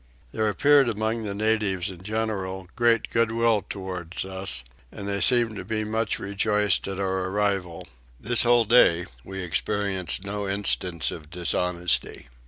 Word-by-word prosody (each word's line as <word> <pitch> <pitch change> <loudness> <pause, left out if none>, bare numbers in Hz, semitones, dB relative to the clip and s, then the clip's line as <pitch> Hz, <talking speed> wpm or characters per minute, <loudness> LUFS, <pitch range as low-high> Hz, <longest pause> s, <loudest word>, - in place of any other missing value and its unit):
There 110 -1 0
appeared 140 +3 +4
among 110 +1 -2
the 100 -1 -3
natives 105 -3 0
in 90 -2 -12
general 95 -3 -3
great 120 -2 +2
goodwill 115 -1 +2
towards 90 -2 -5
us, 95 -6 -2 0.3
and 100 - -7
they 100 -1 -1
seemed 120 -3 +4
to - - -5
be 110 -1 -2
much 110 +1 -1
rejoiced 105 0 +1
at 95 -1 -4
our 95 -1 -1
arrival. 95 -3 -1 0.3
This 120 +2 0
whole 120 -1 +4
day 90 -7 +5 0.2
we 95 +3 -6
experienced 95 -1 -2
no 100 0 -4
instance 95 -4 -1
of 75 -3 -9
dishonesty. 90 -3 -1
100 Hz, 145 wpm, -25 LUFS, 95-110 Hz, 0.3 s, day